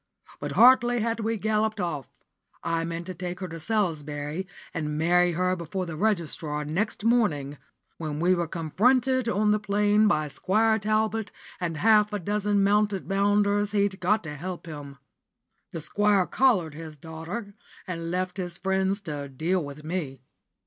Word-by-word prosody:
But -, -, -4 dB
hardly 245 Hz, 0 st, +6 dB
had 230 Hz, +1 st, -1 dB
we 225 Hz, +1 st, -1 dB
galloped 215 Hz, 0 st, 0 dB
off 155 Hz, -7 st, -3 dB, 0.6 s
I 165 Hz, 0 st, 0 dB
meant 170 Hz, +1 st, -4 dB
to 185 Hz, -, -5 dB
take 180 Hz, 0 st, -5 dB
her 185 Hz, -, -4 dB
to 165 Hz, -1 st, -7 dB
Salisbury, 155 Hz, -4 st, -2 dB, 0.3 s
and 150 Hz, -2 st, -2 dB
marry 175 Hz, +2 st, +3 dB
her 185 Hz, +2 st, +1 dB
before 180 Hz, +2 st, -4 dB
the 165 Hz, -2 st, -6 dB
registrar 155 Hz, -6 st, -1 dB
next 195 Hz, +8 st, -2 dB
morning 150 Hz, -, +1 dB, 0.4 s
when 155 Hz, -2 st, -4 dB
we 180 Hz, +3 st, +3 dB
were 175 Hz, -2 st, 0 dB
confronted 240 Hz, -, +2 dB
on 210 Hz, -1 st, +2 dB
the 210 Hz, -, +2 dB
Plain 210 Hz, +1 st, +3 dB
by 155 Hz, -6 st, +2 dB
Squire 220 Hz, +8 st, +2 dB
Talbot 215 Hz, +1 st, 0 dB, 0.3 s
and 170 Hz, -3 st, -2 dB
half 210 Hz, +3 st, +4 dB
a -, -, +1 dB
dozen 205 Hz, +1 st, 0 dB
mounted 205 Hz, -1 st, +2 dB
bounders 205 Hz, +1 st, +2 dB
he'd 200 Hz, -2 st, +1 dB
got 210 Hz, +5 st, +2 dB
to 150 Hz, -2 st, -6 dB
help 175 Hz, +4 st, -6 dB
him. 145 Hz, -4 st, -8 dB, 0.7 s
The 170 Hz, -3 st, -6 dB
Squire 205 Hz, +2 st, +2 dB
collared 190 Hz, -, +2 dB
his 155 Hz, 0 st, -9 dB
daughter, 165 Hz, +8 st, -7 dB, 0.3 s
and 165 Hz, -3 st, -4 dB
left 185 Hz, +1 st, -2 dB
his 175 Hz, -2 st, -4 dB
friends 190 Hz, +1 st, 0 dB
to 145 Hz, -6 st, -5 dB
deal 165 Hz, +7 st, 0 dB
with 145 Hz, +1 st, -9 dB
me. 155 Hz, -6 st, -4 dB
185 Hz, 160 wpm, -26 LUFS, 160-210 Hz, 0.7 s, hardly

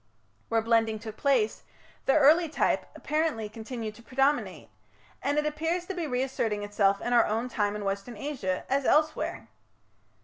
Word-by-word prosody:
Where 225 Hz, -1 st, +2 dB
blending 225 Hz, -1 st, +2 dB
took 220 Hz, 0 st, -8 dB
place, 245 Hz, -6 st, +1 dB, 0.5 s
the 270 Hz, -, +4 dB
early 315 Hz, +3 st, +5 dB
type, -, -, 0 dB
apparently, 305 Hz, -8 st, -1 dB
continued 225 Hz, 0 st, -6 dB
to 215 Hz, -, -15 dB
predominate; 245 Hz, -, 0 dB, 0.5 s
and 285 Hz, +2 st, 0 dB
it 300 Hz, -, +2 dB
appears 325 Hz, +4 st, -1 dB
to 385 Hz, -, -4 dB
be 345 Hz, -4 st, -3 dB
reasserting 250 Hz, -5 st, -1 dB
itself 200 Hz, -1 st, +1 dB
in 245 Hz, -, -1 dB
our 235 Hz, -, +5 dB
own 225 Hz, +4 st, -1 dB
time 205 Hz, -3 st, 0 dB
in 210 Hz, -1 st, -5 dB
Western 200 Hz, +4 st, -3 dB
Asia, 210 Hz, -9 st, -3 dB
as 275 Hz, +1 st, +1 dB
elsewhere. 310 Hz, +3 st, +1 dB
240 Hz, 160 wpm, -28 LUFS, 215-290 Hz, 0.5 s, early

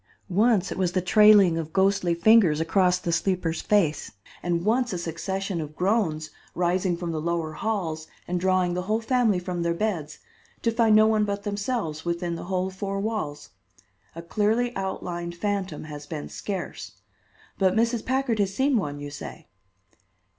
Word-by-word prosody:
Once 200 Hz, 0 st, +2 dB
it -, -, -4 dB
was 180 Hz, -2 st, +1 dB
the 185 Hz, -, +2 dB
trailing 200 Hz, -2 st, +6 dB
of 160 Hz, -1 st, -5 dB
ghostly 190 Hz, -2 st, +2 dB
fingers 180 Hz, -4 st, +5 dB
across 180 Hz, +2 st, +2 dB
the 175 Hz, -1 st, -3 dB
sleeper's 175 Hz, -2 st, 0 dB
face, 170 Hz, -, +1 dB, 0.3 s
and 175 Hz, 0 st, -1 dB
once 245 Hz, +3 st, +2 dB
a -, -, -2 dB
succession 175 Hz, +2 st, -3 dB
of 150 Hz, 0 st, -8 dB
groans 180 Hz, -6 st, 0 dB, 0.2 s
rising 180 Hz, 0 st, +1 dB
from 170 Hz, -1 st, -4 dB
the 155 Hz, -1 st, -3 dB
lower 165 Hz, -1 st, -2 dB
halls 160 Hz, -4 st, -3 dB, 0.2 s
and 180 Hz, 0 st, -1 dB
drawing 185 Hz, -1 st, +2 dB
the 180 Hz, -, -1 dB
whole 215 Hz, +4 st, 0 dB
family 230 Hz, -3 st, +2 dB
from 180 Hz, -1 st, -3 dB
their 170 Hz, 0 st, 0 dB
beds, 170 Hz, -7 st, -2 dB, 0.5 s
to 230 Hz, -, +2 dB
find 225 Hz, -2 st, +4 dB
no 215 Hz, 0 st, +7 dB
one 220 Hz, -1 st, +3 dB
but 200 Hz, -1 st, -2 dB
themselves 205 Hz, -6 st, -3 dB
within 170 Hz, 0 st, -2 dB
the 170 Hz, -, -6 dB
whole 185 Hz, 0 st, -1 dB
four 195 Hz, +1 st, -4 dB
walls. 200 Hz, -9 st, -4 dB, 0.6 s
A 165 Hz, -, -7 dB
clearly 220 Hz, +7 st, 0 dB
outlined 175 Hz, -3 st, -4 dB
phantom 195 Hz, -4 st, -2 dB
has 150 Hz, -1 st, -9 dB
been 150 Hz, -2 st, -6 dB
scarce. 180 Hz, -, -5 dB, 0.7 s
But 190 Hz, -1 st, +3 dB
Mrs. 230 Hz, 0 st, +1 dB
Packard 260 Hz, -4 st, 0 dB
has 195 Hz, -2 st, +1 dB
seen 265 Hz, +1 st, +2 dB
one, 145 Hz, -8 st, -3 dB
you 145 Hz, 0 st, -7 dB
say." 140 Hz, -, -9 dB
185 Hz, 170 wpm, -25 LUFS, 170-210 Hz, 0.7 s, no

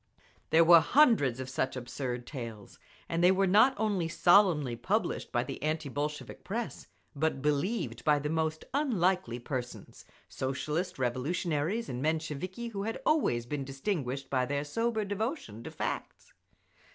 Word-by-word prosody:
There 165 Hz, +1 st, +6 dB
were 170 Hz, 0 st, +9 dB
hundreds 160 Hz, -, +4 dB
of 130 Hz, -, -4 dB
such 130 Hz, 0 st, -2 dB
absurd 125 Hz, -1 st, -4 dB
tales, 115 Hz, -8 st, -8 dB, 0.3 s
and 170 Hz, +1 st, -1 dB
they 180 Hz, -, +7 dB
were 195 Hz, +1 st, +3 dB
not 215 Hz, +8 st, +5 dB
only 205 Hz, -6 st, 0 dB
solemnly 170 Hz, -, +4 dB
published -, -, -1 dB
by -, -, +1 dB
the -, -, -7 dB
anti 155 Hz, 0 st, -1 dB
Bolshevik 150 Hz, +2 st, -4 dB
press, 230 Hz, +3 st, -4 dB, 0.3 s
but 145 Hz, -2 st, -1 dB
believed 150 Hz, +10 st, -1 dB
by 150 Hz, -1 st, +4 dB
the 145 Hz, +1 st, -2 dB
most 160 Hz, 0 st, -1 dB
unlikely 185 Hz, -, +1 dB
persons—Socialist 130 Hz, +5 st, -5 dB
Revolutionaries 150 Hz, -, -1 dB
and 125 Hz, 0 st, -4 dB
Mensheviki 160 Hz, +8 st, -2 dB
who 200 Hz, -3 st, -5 dB
had 225 Hz, +3 st, -3 dB
always 195 Hz, -, +2 dB
been 140 Hz, +3 st, -3 dB
distinguished 135 Hz, -1 st, -3 dB
by 130 Hz, -2 st, +2 dB
their 140 Hz, +1 st, -1 dB
sober 220 Hz, +7 st, -1 dB
devotion 205 Hz, -, -4 dB
to -, -, -5 dB
facts…. -, -, -5 dB
155 Hz, 140 wpm, -30 LUFS, 135-195 Hz, 0.3 s, were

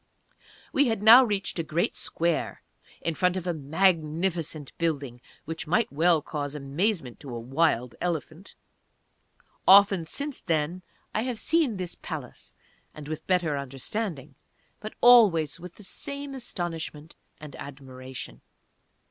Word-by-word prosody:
We 280 Hz, 0 st, +4 dB
had 225 Hz, -3 st, -1 dB
now 235 Hz, +4 st, +10 dB
reached 200 Hz, -6 st, -1 dB
a -, -, 0 dB
great 160 Hz, +2 st, -1 dB
square 170 Hz, -1 st, -1 dB, 0.4 s
in 165 Hz, -, -1 dB
front 180 Hz, +2 st, +1 dB
of 185 Hz, -, -5 dB
a 175 Hz, -, 0 dB
magnificent 160 Hz, 0 st, 0 dB
building 140 Hz, -7 st, -2 dB, 0.2 s
which 165 Hz, +1 st, -5 dB
might 210 Hz, +2 st, +1 dB
well 160 Hz, 0 st, +3 dB
cause 145 Hz, -2 st, -4 dB
amazement 145 Hz, -, -2 dB
to 135 Hz, -5 st, -8 dB
a -, -, -4 dB
"wild" 125 Hz, -1 st, 0 dB
elephant. 170 Hz, +1 st, -4 dB, 1.1 s
Often 195 Hz, -3 st, +7 dB
since 285 Hz, -, -3 dB
then 165 Hz, +1 st, -1 dB, 0.3 s
I -, -, 0 dB
have 245 Hz, -1 st, -3 dB
seen 290 Hz, -6 st, +1 dB
this 180 Hz, -2 st, -4 dB
Palace, -, -, -8 dB, 0.4 s
and 150 Hz, -1 st, -9 dB
with 155 Hz, 0 st, -6 dB
better 175 Hz, -5 st, +2 dB
understanding, 140 Hz, -, -4 dB, 0.5 s
but 215 Hz, +1 st, -8 dB
always 195 Hz, -, +6 dB
with 180 Hz, 0 st, -10 dB
the 210 Hz, -, -13 dB
same 280 Hz, +8 st, -6 dB
astonishment 165 Hz, -, -5 dB, 0.2 s
and 150 Hz, -2 st, -10 dB
admiration. 130 Hz, -, -9 dB
165 Hz, 130 wpm, -27 LUFS, 150-195 Hz, 1.1 s, now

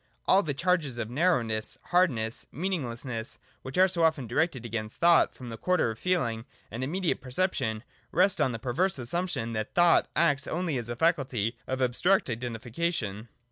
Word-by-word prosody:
All 195 Hz, -, +5 dB
the 150 Hz, -7 st, -3 dB
charges 160 Hz, -5 st, 0 dB
of 115 Hz, -1 st, -4 dB
narrow 160 Hz, -1 st, +3 dB
ness, 110 Hz, -1 st, -2 dB
hardness, 125 Hz, -12 st, +1 dB
meaninglessness, 125 Hz, -9 st, -3 dB, 0.2 s
which 130 Hz, +4 st, -7 dB
are 185 Hz, +1 st, +6 dB
so 180 Hz, -2 st, -1 dB
often 160 Hz, -5 st, +2 dB
directed 125 Hz, +1 st, -1 dB
against 110 Hz, -1 st, -4 dB
thought 170 Hz, -1 st, +5 dB
from 125 Hz, -2 st, -9 dB
the 115 Hz, -, -6 dB
quarter 180 Hz, -10 st, +1 dB
of 110 Hz, -, -9 dB
feeling 120 Hz, -11 st, 0 dB, 0.3 s
and 115 Hz, +4 st, -4 dB
immediate 175 Hz, +6 st, -1 dB
perception, 125 Hz, -, -1 dB, 0.3 s
rest 185 Hz, -1 st, +3 dB
on 135 Hz, -3 st, +3 dB
the 115 Hz, -, -4 dB
perverse 140 Hz, +10 st, 0 dB
assumption 130 Hz, -3 st, -2 dB
that 110 Hz, -1 st, -4 dB
thought 175 Hz, -1 st, +5 dB
acts 145 Hz, -4 st, +2 dB
only 170 Hz, -3 st, -1 dB
as 120 Hz, -1 st, -5 dB
a 120 Hz, -, -3 dB
faculty 130 Hz, -, +1 dB
of 130 Hz, 0 st, -1 dB
abstract 130 Hz, +6 st, +2 dB
Identification. 120 Hz, -, -3 dB
130 Hz, 170 wpm, -28 LUFS, 115-175 Hz, 0.3 s, are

